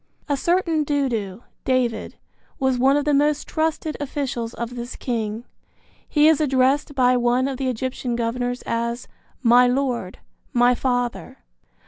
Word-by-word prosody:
A 290 Hz, -, +1 dB
certain 335 Hz, +1 st, +1 dB
Dudu 240 Hz, -9 st, -2 dB, 0.2 s
(David) 250 Hz, -4 st, 0 dB, 0.4 s
was 265 Hz, -2 st, +1 dB
one 270 Hz, +3 st, +4 dB
of 290 Hz, -, -1 dB
the 295 Hz, -, +2 dB
most 295 Hz, +1 st, +2 dB
trusted 315 Hz, -1 st, -1 dB
officials 265 Hz, -5 st, -3 dB
of 235 Hz, +1 st, -5 dB
this 240 Hz, +1 st, -6 dB
king. 225 Hz, -2 st, -3 dB, 0.6 s
He 300 Hz, 0 st, +4 dB
is 315 Hz, -1 st, +4 dB
addressed 275 Hz, +1 st, +2 dB
by 250 Hz, -1 st, +4 dB
one 245 Hz, +1 st, +2 dB
of 270 Hz, -2 st, -3 dB
the 265 Hz, -1 st, -1 dB
Egyptian 250 Hz, 0 st, -3 dB
governors 245 Hz, +1 st, -2 dB
as 235 Hz, +1 st, -2 dB, 0.4 s
"My 245 Hz, +1 st, +6 dB
lord, 245 Hz, -7 st, -1 dB, 0.4 s
my 245 Hz, 0 st, +4 dB
father." 245 Hz, -, -2 dB
255 Hz, 140 wpm, -22 LUFS, 240-280 Hz, 0.6 s, My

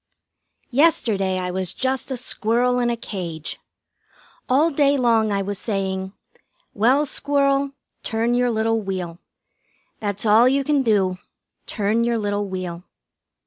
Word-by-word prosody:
Yesterday 220 Hz, -, +2 dB
I 180 Hz, -1 st, -2 dB
was 185 Hz, -1 st, -2 dB
just 260 Hz, +1 st, -1 dB
a 260 Hz, -, -2 dB
squirrel 245 Hz, +1 st, 0 dB
in 240 Hz, -1 st, +1 dB
a 235 Hz, -, -1 dB
cage. 175 Hz, -8 st, -5 dB, 0.9 s
All 295 Hz, +6 st, +4 dB
day 280 Hz, -1 st, +3 dB
long 225 Hz, -4 st, +2 dB
I 200 Hz, -1 st, 0 dB
was 200 Hz, 0 st, -4 dB
saying: 190 Hz, -2 st, -3 dB, 0.6 s
"Well, 255 Hz, +8 st, +3 dB
Squirrel, 280 Hz, -1 st, +1 dB, 0.3 s
turn 230 Hz, +1 st, 0 dB
your 245 Hz, 0 st, +2 dB
little 225 Hz, 0 st, +1 dB
wheel. 180 Hz, -4 st, -5 dB, 0.8 s
That's 205 Hz, 0 st, -2 dB
all 220 Hz, +3 st, +6 dB
you 275 Hz, +1 st, +1 dB
can 290 Hz, 0 st, +2 dB
do; 195 Hz, -6 st, +1 dB, 0.5 s
turn 215 Hz, +2 st, 0 dB
your 235 Hz, 0 st, +1 dB
little 205 Hz, -1 st, -1 dB
wheel." 180 Hz, -2 st, -5 dB
225 Hz, 135 wpm, -22 LUFS, 195-255 Hz, 0.9 s, all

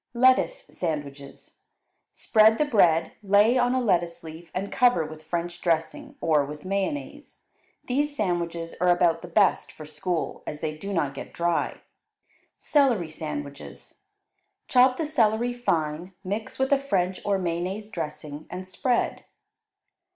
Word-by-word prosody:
Lettuce 260 Hz, -, +3 dB
Sandwiches 145 Hz, -, -6 dB, 0.6 s
Spread 220 Hz, 0 st, +4 dB
the 300 Hz, -, +2 dB
bread, 170 Hz, -, +3 dB
lay 205 Hz, +4 st, +4 dB
on 245 Hz, 0 st, +2 dB
a -, -, +2 dB
lettuce 175 Hz, -7 st, 0 dB
leaf 165 Hz, +1 st, -10 dB
and 195 Hz, +2 st, -4 dB
cover 245 Hz, -10 st, +3 dB
with 155 Hz, 0 st, -9 dB
French 170 Hz, +2 st, -4 dB
dressing, 165 Hz, -2 st, -1 dB
or 155 Hz, -3 st, +3 dB
with 150 Hz, +3 st, -8 dB
mayonnaise. 200 Hz, +10 st, -4 dB, 0.4 s
These 290 Hz, +3 st, 0 dB
sandwiches 170 Hz, -5 st, -2 dB
are 180 Hz, -, +4 dB
about 175 Hz, -2 st, +3 dB
the 175 Hz, -, -8 dB
best 195 Hz, +3 st, +2 dB
for 155 Hz, -, -11 dB
school, 160 Hz, +3 st, -3 dB
as 150 Hz, -, -5 dB
they 155 Hz, 0 st, -3 dB
do 200 Hz, +6 st, -6 dB
not 150 Hz, -7 st, 0 dB
get 135 Hz, -, -9 dB
dry. 170 Hz, 0 st, -1 dB, 0.8 s
Celery 250 Hz, -, +2 dB
Sandwiches 145 Hz, -2 st, -8 dB, 0.7 s
Chop 255 Hz, 0 st, +5 dB
the 320 Hz, -, -1 dB
celery 240 Hz, -4 st, +1 dB
fine, 170 Hz, -6 st, -2 dB
mix 205 Hz, +3 st, -4 dB
with 265 Hz, +1 st, 0 dB
a 280 Hz, -, +5 dB
French 190 Hz, -9 st, -1 dB
or 200 Hz, -1 st, +1 dB
mayonnaise 185 Hz, +3 st, -3 dB
dressing, 150 Hz, -5 st, -6 dB
and 185 Hz, +2 st, -7 dB
spread. 245 Hz, +6 st, -1 dB
180 Hz, 140 wpm, -26 LUFS, 160-230 Hz, 0.8 s, Chop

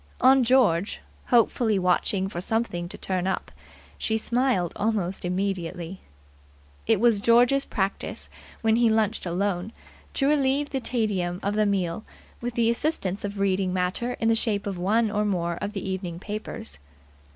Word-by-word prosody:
On 265 Hz, 0 st, +6 dB
George, 225 Hz, -7 st, +3 dB, 0.3 s
hopefully 230 Hz, -2 st, +3 dB
watching 185 Hz, +1 st, +1 dB
for 175 Hz, -3 st, -5 dB
something 185 Hz, -5 st, -1 dB
to -, -, -7 dB
turn 185 Hz, -1 st, -2 dB
up, 190 Hz, -, -2 dB, 0.5 s
she 220 Hz, -, 0 dB
smiled 235 Hz, -6 st, 0 dB
almost 200 Hz, -4 st, -1 dB
immediately. 180 Hz, -1 st, -3 dB, 0.9 s
It -, -, +3 dB
was 230 Hz, -2 st, +4 dB
George's 245 Hz, +5 st, +4 dB
practice, 195 Hz, 0 st, -3 dB, 0.4 s
when 225 Hz, 0 st, +3 dB
he 235 Hz, -1 st, +4 dB
lunched 220 Hz, -3 st, +1 dB
alone, 185 Hz, +2 st, -1 dB, 0.4 s
to 275 Hz, -, +2 dB
relieve 285 Hz, 0 st, +2 dB
the 270 Hz, -, -1 dB
tedium 200 Hz, -8 st, -1 dB
of 200 Hz, -, 0 dB
the 210 Hz, 0 st, +2 dB
meal 190 Hz, 0 st, -1 dB, 0.4 s
with 240 Hz, 0 st, -4 dB
the 230 Hz, -1 st, +3 dB
assistance 230 Hz, -, -2 dB
of 205 Hz, 0 st, -4 dB
reading 190 Hz, -1 st, +1 dB
matter 185 Hz, +7 st, -1 dB
in 225 Hz, -, -1 dB
the 225 Hz, -, +5 dB
shape 215 Hz, -3 st, 0 dB
of 195 Hz, -3 st, -4 dB
one 215 Hz, +4 st, +2 dB
or 210 Hz, 0 st, +1 dB
more 175 Hz, -4 st, -1 dB
of 205 Hz, +1 st, -3 dB
the 195 Hz, -2 st, -4 dB
evening 185 Hz, -3 st, -4 dB
papers. 195 Hz, -, -7 dB
205 Hz, 155 wpm, -26 LUFS, 185-230 Hz, 0.9 s, On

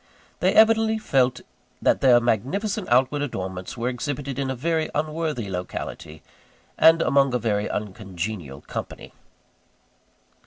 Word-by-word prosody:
They -, -, +2 dB
evidently 220 Hz, 0 st, +5 dB
felt 130 Hz, -, +1 dB, 0.4 s
that -, -, +2 dB
their 125 Hz, -3 st, +6 dB
magnificent 180 Hz, -, -1 dB
outward 130 Hz, +4 st, +3 dB
adornments 95 Hz, -9 st, -5 dB
were 120 Hz, +1 st, -2 dB
exhibited 140 Hz, +1 st, -4 dB
in 135 Hz, -1 st, -1 dB
a 130 Hz, -, -2 dB
very 160 Hz, +4 st, -1 dB
unworthy 155 Hz, -6 st, -2 dB
locality, 90 Hz, -4 st, -6 dB, 0.5 s
and 165 Hz, +1 st, +6 dB
among 135 Hz, -2 st, +3 dB
a -, -, +4 dB
very 105 Hz, -3 st, -1 dB
uncongenial 95 Hz, -7 st, -5 dB
company. -, -, -7 dB
130 Hz, 120 wpm, -24 LUFS, 105-155 Hz, 0.5 s, their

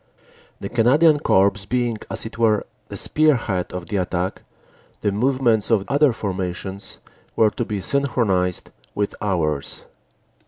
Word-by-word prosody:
"The 100 Hz, -, -5 dB
Canadian 145 Hz, +8 st, +4 dB
Corps 100 Hz, -8 st, +4 dB, 0.2 s
being, 120 Hz, -3 st, 0 dB
as 115 Hz, -, -3 dB
it 115 Hz, +1 st, -8 dB
were, 110 Hz, -2 st, +3 dB, 0.2 s
the -, -, -6 dB
spearhead 120 Hz, -12 st, +1 dB
of 90 Hz, -1 st, -5 dB
the 100 Hz, -, -2 dB
attack, 90 Hz, 0 st, -2 dB, 0.6 s
the 105 Hz, -, +1 dB
movements 120 Hz, -1 st, +1 dB
of 105 Hz, -4 st, +2 dB
other 145 Hz, 0 st, +4 dB
formations 95 Hz, -2 st, -4 dB, 0.4 s
were 110 Hz, -1 st, +4 dB
to 120 Hz, -, -3 dB
be 105 Hz, -3 st, -3 dB
syn 140 Hz, +7 st, 0 dB
chronized 95 Hz, -8 st, 0 dB, 0.2 s
with 105 Hz, 0 st, -1 dB
ours." 80 Hz, -8 st, -1 dB
105 Hz, 135 wpm, -22 LUFS, 95-120 Hz, 0.6 s, Canadian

